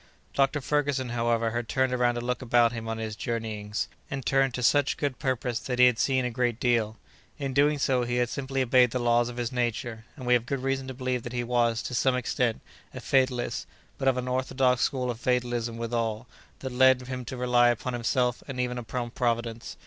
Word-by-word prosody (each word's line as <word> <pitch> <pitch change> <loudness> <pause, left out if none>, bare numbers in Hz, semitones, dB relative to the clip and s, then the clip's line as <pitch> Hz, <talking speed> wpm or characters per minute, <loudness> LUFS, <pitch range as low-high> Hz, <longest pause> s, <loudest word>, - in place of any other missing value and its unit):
Doctor 140 +1 +2
Ferguson, 145 -3 0
however, 115 -1 0
had 120 0 -3
turned 130 -1 +1
around 125 -1 +2
to 120 - -3
look 125 +2 -2
about 120 -2 +3
him 115 -2 -6
on 115 0 -3
his 110 -1 -4
journeyings, 110 -2 -3 0.2
and 135 -3 -5
turned 135 +2 +2
to 125 - -3
such 145 +3 +3
good 140 -4 -2
purpose 125 -2 -1
that 125 +3 -4
he 125 - +7
had 125 -3 +3
seen 130 +2 +2
a 125 - -2
great 120 -1 -1
deal. 115 -3 +1 0.4
In 135 -2 -3
doing 145 +2 +3
so, 130 -3 +1
he 120 0 -2
had 125 0 +2
simply 135 +1 -2
obeyed 125 0 +5
the 125 - -2
laws 120 0 +2
of 120 - -8
his 120 0 -2
nature, 120 -2 -2
and 130 - -9
we 125 - +3
have 120 -1 +2
good 135 -1 -2
reason 135 0 -1
to 130 - -6
believe 130 -1 -2
that 120 +1 -7
he 120 -1 -1
was, 120 -1 +1
to - - -5
some 130 +1 +2
extent, 125 -2 -1 0.3
a - - -5
fatalist, 130 -2 0 0.3
but 135 - -1
of 130 -1 +3
an 125 0 -3
orthodox 130 0 +1
school 125 -2 0
of 115 - -8
fatalism 120 -1 -1
withal, 115 -1 -2 0.4
that 130 - -4
led 130 0 +5
him 125 0 -5
to 130 - -6
rely 125 -1 +4
upon 120 +1 -2
himself 125 +1 0
and 135 -3 -5
even 125 0 -1
upon 120 +1 -4
Providence. 115 -2 -2
125 Hz, 215 wpm, -27 LUFS, 120-130 Hz, 0.4 s, he